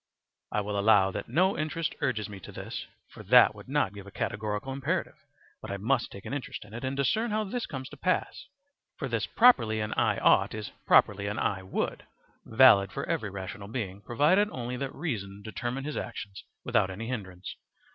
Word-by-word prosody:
I 105 - +1
will 100 0 -2
allow 100 -2 +5
that - - -5
no 185 +9 +3
interest 155 +1 -2
urges 110 -6 0
me 100 -2 -9
to - - -11
this, - - -6 0.2
for - - -11
that 120 +2 +6
would 105 +1 -13
not 135 -9 +1
give 100 -1 -10
a - - -10
categorical 105 +6 -3
imperative, 150 +7 -1 0.5
but - - -8
I 100 - -3
must 115 +5 0
take 100 - -10
an - - -5
interest 140 -6 -5
in 105 - -15
it 120 - -6
and 130 +1 -2
discern 215 - +1
how 215 +1 0
this 225 +4 -3
comes 130 -2 -6
to 150 - -12
pass; 185 - -1 0.5
for - - -3
this - - -1
properly 115 - +5
an 105 0 -2
"I - - +2
ought" - - +4
is 105 -1 -6 0.2
properly 100 0 +4
an 105 +1 -3
"I 95 - 0
would," 95 - -3 0.4
valid 110 -5 +6
for - - -4
every 105 - -1
rational 100 +1 -7
being, 100 -4 -4
provided 155 - +3
only 125 - -4
that 135 +1 -4
reason 105 - -4
determined 120 +6 -4
his 150 - -4
actions 100 -2 -6 0.2
without 95 - +2
any 100 +5 -6
hindrance. 95 -7 -6
115 Hz, 195 wpm, -29 LUFS, 100-140 Hz, 0.5 s, that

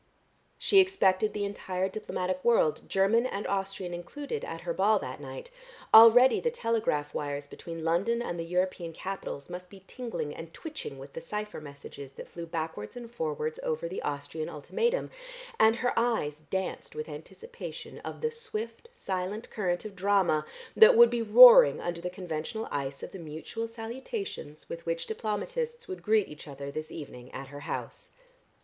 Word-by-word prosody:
She 390 - +5
expected 215 - +3
the 205 -1 -2
entire 190 -2 -2
diplomatic 185 -2 -3
world, 230 -10 +2
German 210 +6 +3
and 205 -4 -4
Austrian 195 -2 -2
included, 285 - -5
at - - -6
her - - -2
ball - - +4
that - - -5
night; - - -8 0.4
already 230 +3 +9
the 480 - +1
telegraph 225 - -1
wires 145 -1 -3
between 165 +3 -8
London 185 +9 +1
and 175 -8 -3
the - - -1
European 180 -1 -1
capitals 185 -6 -5
must 180 0 -8
be 195 -1 -14
tingling 230 - -5
and 165 0 -9
twitching 305 - -7
with 135 +1 -11
the 165 - -6
cypher 210 +1 -5
messages 140 -1 -10
that - - -9
flew 170 -1 -8
backwards 160 -10 -4
and 235 -1 -8
forwards 155 -7 -3
over 160 +2 -2
the 185 - -5
Austrian 145 +2 -4
ultimatum, 465 - -1 0.5
and 220 +1 +6
her 245 +1 0
eyes 220 -11 0
danced 190 0 -3
with 460 0 -4
anticipation 470 +1 -9
of - - -7
the 465 -1 0
swift 340 - -6
silent 195 - -4
current 180 -4 -1
of 210 -2 -7
drama 185 -5 +2 0.3
that 440 - +8
would 235 0 +8
be 240 -1 0
roaring 230 - +9
under 175 -1 -3
the 180 - -3
conventional 180 +3 -4
ice 140 -1 -3
of - - -6
the 190 - -8
mutual 165 +8 -5
salutations 230 - -6
with 165 - -7
which 165 0 -1
diplomatists 470 - -3
would 375 - -6
greet 215 -2 +3
each 150 +1 -11
other 140 0 -7
this 155 +2 -5
evening 125 -5 -9
at 135 0 -7
her 145 0 -8
house. 145 - -6
190 Hz, 170 wpm, -29 LUFS, 160-230 Hz, 0.5 s, already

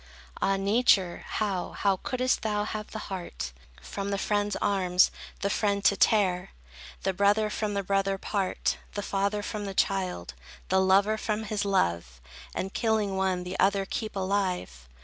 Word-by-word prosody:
Ah, 195 0 +2
Nature! 195 -3 +3
how, 200 -4 -2
how 195 -2 +1
couldst 255 +5 0
thou 210 -1 0
have 210 0 -5
the - - -6 0.2
heart, 175 - -5 0.3
From 200 0 -4
the 200 - 0
friend's 205 0 0
arms 185 -2 +3 0.3
the 200 - +1
friend 200 -2 0
to 200 - +6
tear, 185 -4 +3 0.5
The 190 - +1
brother 205 +3 +3
from 210 -1 -2
the 200 - 0
brother 195 0 +1
part, 195 -1 -1 0.2
The 205 - -2
father 200 +1 0
from 210 0 -4
the 195 -1 -5
child, 185 - 0 0.4
The 190 0 +4
lover 200 +3 +4
from 215 0 -1
his 210 -1 -2
love, 85 - 0 0.4
And, 190 +1 -3
killing 220 -3 +1
one, 190 -1 0
the 180 +1 -5
other 195 0 +3
keep 215 +2 -4
alive? 185 - -1
200 Hz, 160 wpm, -28 LUFS, 190-210 Hz, 0.5 s, to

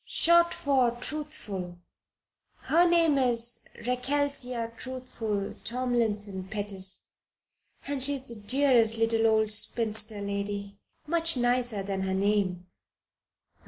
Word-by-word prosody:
"Short 340 0 +4
for 265 -4 +1
Truthful. 210 -13 -3 0.8
Her 345 +2 +2
name 330 -4 +3
is 240 -2 +4 0.2
Rechelsea 250 -2 -2
Truthful 230 -5 -5
Tomlinson 220 -6 -2
Pettis 195 -2 -2 0.8
and 280 -1 -3
she 285 +2 +5
is 265 -1 -2
the 235 - -9
dearest 230 0 +3
little 225 0 +2
old 220 -1 +1
spinster 215 0 +1
lady 200 0 -5 0.3
much 330 -1 +2
nicer 245 -4 -1
than 195 -1 -4
her 190 0 -2
name." 195 -3 -1
230 Hz, 105 wpm, -27 LUFS, 205-265 Hz, 0.8 s, she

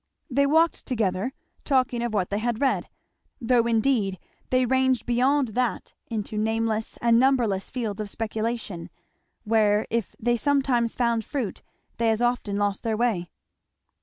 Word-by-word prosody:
They 280 +2 +3
walked 320 +3 +2
together, 215 -2 0 0.3
talking 255 -3 +1
of 240 -1 -1
what 200 -4 -1
they 205 - 0
had 230 0 -1
read, 275 -2 +1 0.5
though 235 -1 +2
indeed 225 -4 +1 0.3
they 255 0 +3
ranged 260 -1 +2
beyond 255 +2 +2
that 245 +2 -2
into 215 -1 -3
nameless 220 0 -1
and 235 -1 +5
numberless 240 -7 +2
fields 220 -5 -3
of 210 - -5
speculation, 220 -4 -3 0.5
where 215 -1 +3
if 230 -2 -2
they 240 +1 +1
sometimes 260 -4 +1
found 235 -2 +1
fruit 245 -4 -4 0.4
they 230 -1 +2
as 220 0 +1
often 240 -4 0
lost 205 -1 0
their 225 -2 -1
way. 215 -7 0
230 Hz, 145 wpm, -25 LUFS, 215-255 Hz, 0.5 s, and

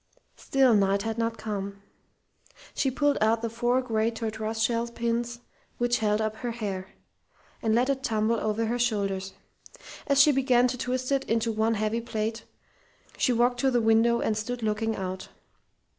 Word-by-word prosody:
Still 265 -3 +3
Knight 200 -1 +2
had 225 0 -3
not 230 0 -1
come. 200 -2 -5 0.9
She 270 - +1
pulled 290 +2 +1
out 225 +1 +2
the 230 - -2
four 240 +2 +1
great 225 -1 0
tortoise 220 0 -3
shell 230 +1 +1
pins 235 0 -2 0.4
which 240 0 +1
held 210 -1 +1
up 215 0 -2
her 245 - -4
hair, 200 -5 -4 0.7
and 220 -1 +1
let 245 +2 +3
it 275 -1 0
tumble 220 -2 0
over 215 +2 -1
her 240 +2 -1
shoulders. 195 -5 -1 0.7
As 280 -1 +3
she 295 +1 +7
began 255 -3 +3
to 250 - -2
twist 255 +1 -2
it 275 -1 +2
into 225 -1 0
one 220 +1 +1
heavy 215 +2 -1
plait, 225 0 -3 0.7
she - - +1
walked 245 +1 +2
to 270 - +3
the 245 -2 +2
window 225 +1 +3
and 220 - 0
stood 235 +2 -4
looking 220 +1 0
out. 185 0 -5
230 Hz, 170 wpm, -27 LUFS, 215-245 Hz, 0.9 s, she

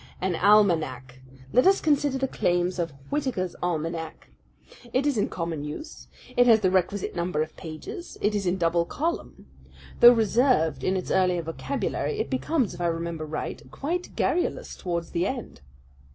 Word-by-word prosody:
An 185 -1 0
almanac! 160 -11 +2 0.3
Let 250 - +5
us 390 0 +5
consider 290 -3 +1
the 270 0 0
claims 175 -4 0
of 165 -2 -1 0.2
Whitaker's 255 - -1
Almanac. 165 -1 -3 0.6
It 260 +4 +1
is 290 -2 +2
in 205 - 0
common 165 -4 -4
use. 230 - -8 0.3
It 245 0 +5
has 225 -2 +6
the 185 -2 +2
requisite 190 +1 0
number 170 -3 0
of 155 - -10
pages. 160 - -8
It 210 - +1
is 200 -3 -1
in 180 +2 +1
double 170 -1 +2
column. 325 - -4 0.5
Though 240 +1 +10
reserved 220 - +2
in 190 +1 +1
its 185 - -4
earlier 180 -2 +2
vocabulary, 275 - -3
it 440 - -3
becomes, 260 - 0
if 175 - -8
I 175 - +1
remember 165 -1 -3
right, 155 - -4
quite 345 +6 -4
garrulous 355 - -1
towards 170 -2 -4
the 175 +2 0
end." 245 - -6
185 Hz, 165 wpm, -26 LUFS, 165-255 Hz, 0.6 s, Though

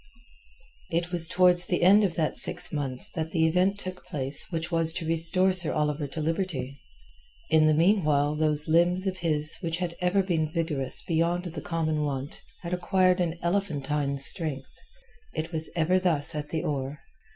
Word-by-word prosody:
It 170 +1 -2
was 170 -2 +4
towards 180 +1 +3
the 175 - -1
end 200 +4 +6
of 180 -5 -1
that 155 -2 -1
six - - +4
months 140 +3 -3
that 160 -3 -4
the 160 -1 +1
event 180 +5 +1
took 185 -2 -7
place 140 +2 -1
which 165 0 -4
was 165 -1 +2
to 170 - -4
restore 165 +4 +4
Sir 185 -3 +1
Oliver 150 -1 -1
to 150 +4 -7
liberty. 155 -5 -3 0.7
In 155 -1 +4
the 155 - +3
meanwhile 155 -5 +2
those 150 -1 0
limbs 175 +3 +2
of 190 -1 -2
his 155 -3 0
which 165 -2 -2
had 175 -1 -4
ever 185 +2 +1
been 165 -5 -1
vigorous 155 -6 -2
beyond 170 +1 -1
the 165 -3 -7
common 155 -2 -2
wont 140 -1 -4 0.2
had 170 +1 -5
acquired 185 +1 +1
an 170 -1 -2
elephantine 150 -6 -2
strength. 140 -1 -3 0.6
It 160 +1 -4
was 160 -1 +6
ever 175 +3 +2
thus 165 -6 +1
at 150 -1 -5
the 160 - -3
oar. 140 0 -4
165 Hz, 175 wpm, -26 LUFS, 150-180 Hz, 0.7 s, end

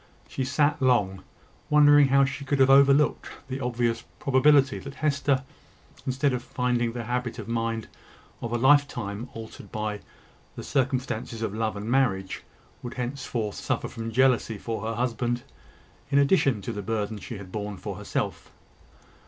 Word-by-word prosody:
She 135 - -3
sat 145 +3 +1
long, 105 -8 +2 0.5
wondering 145 -1 +7
how 140 +1 +5
she 135 +1 -5
could 140 +1 0
have 135 0 +5
overlooked 140 +2 +5 0.2
the 130 0 -4
obvious 120 -2 -1
probability 140 0 +4
that 140 0 -9
Hester, 140 -2 +1 0.6
instead 130 +1 +1
of 125 - -2
finding 120 -2 -1
the 120 -1 -4
habit 125 +1 -3
of 110 -3 -7
mind 115 -1 -2 0.5
of 115 - -4
a 120 - +1
lifetime 125 -5 +2
altered 110 -1 -9
by 105 -1 -3 0.6
the - - -7
circumstances 125 -4 -1
of 105 - -2
love 110 0 -1
and 100 +1 -6
marriage, 115 -7 +1 0.4
would 120 - -7
henceforth 125 -4 -3
suffer - - -2
from 115 0 -6
jealousy 125 -2 +2
for 110 +1 -4
her 115 +1 -3
husband 120 0 -1 0.7
in 140 - +2
addition 140 - +3
to 120 - -4
the 105 - -4
burden 105 0 -2
she 115 - -7
had 95 -2 -10
borne 105 -1 -4
for - - -6
herself. - - -4
125 Hz, 155 wpm, -26 LUFS, 115-135 Hz, 0.7 s, wondering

